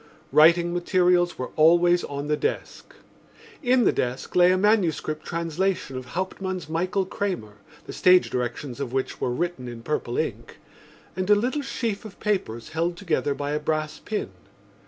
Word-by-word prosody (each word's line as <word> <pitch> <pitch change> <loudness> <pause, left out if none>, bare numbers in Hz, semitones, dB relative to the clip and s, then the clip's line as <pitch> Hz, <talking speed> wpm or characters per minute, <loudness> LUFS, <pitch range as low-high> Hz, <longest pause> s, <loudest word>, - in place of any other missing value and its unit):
Writing 170 +2 +5
materials 175 0 +2
were 130 - -5
always 175 +2 +5
on 140 0 -5
the 150 - +2
desk. - - -4 0.7
In 250 -2 +3
the - - +4
desk 125 +1 -3
lay 180 0 +6
a 185 - +3
manuscript 185 -7 +1
translation 170 -2 -2
of 130 0 -5
Hauptmann's 185 +4 -4
Michael 185 +4 -1
Kramer, 180 - -4 0.3
the - - -8
stage 180 0 +4
directions 125 +1 -3
of 130 -3 -4
which 130 0 -2
were - - 0
written 130 0 -3
in 120 -1 -8
purple 135 -4 -2
ink, - - -4 0.6
and 185 +2 -2
a 210 - +7
little 250 +8 0
sheaf 230 -6 -3
of 215 -3 -11
papers 185 - -2
held 170 +2 -1
together 160 -6 -1
by 145 0 -3
a 150 - 0
brass 155 0 -2
pin. 215 - -4
170 Hz, 160 wpm, -25 LUFS, 145-185 Hz, 0.7 s, a